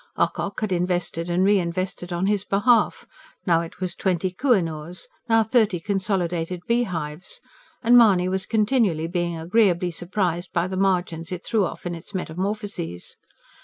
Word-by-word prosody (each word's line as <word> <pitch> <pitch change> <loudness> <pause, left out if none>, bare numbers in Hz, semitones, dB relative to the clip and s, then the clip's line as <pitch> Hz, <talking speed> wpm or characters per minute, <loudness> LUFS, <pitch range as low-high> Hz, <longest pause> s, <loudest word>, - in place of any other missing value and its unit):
Ocock 200 +1 -1
had 215 -2 -1
invested 175 -1 -1
and 175 +2 +2
re 200 +1 +4
invested 180 +1 -3
on 175 +2 0
his 200 -1 +1
behalf 210 +3 +2 0.4
now 170 -4 +3
it 170 +1 -9
was 185 -1 -3
twenty 185 -1 0
"Koh 250 +7 +3
i - - +3
noors," 165 +2 -6 0.2
now 225 0 +5
thirty 220 -5 +2
"Consolidated 180 -2 -1
Beehives" 180 - -2 0.4
and 240 +1 +6
Mahony 200 -7 +6
was 190 +1 -1
continually 215 -7 +2
being 175 0 -2
agreeably 180 0 +2
surprised 175 0 -2
by 175 -1 +1
the 190 - -4
margins 180 -3 0
it 180 -1 -5
threw 215 -4 +2
off - - -7
in 175 - -2
its 170 +4 -9
metamorphoses. 185 - -4
185 Hz, 160 wpm, -24 LUFS, 170-205 Hz, 0.4 s, and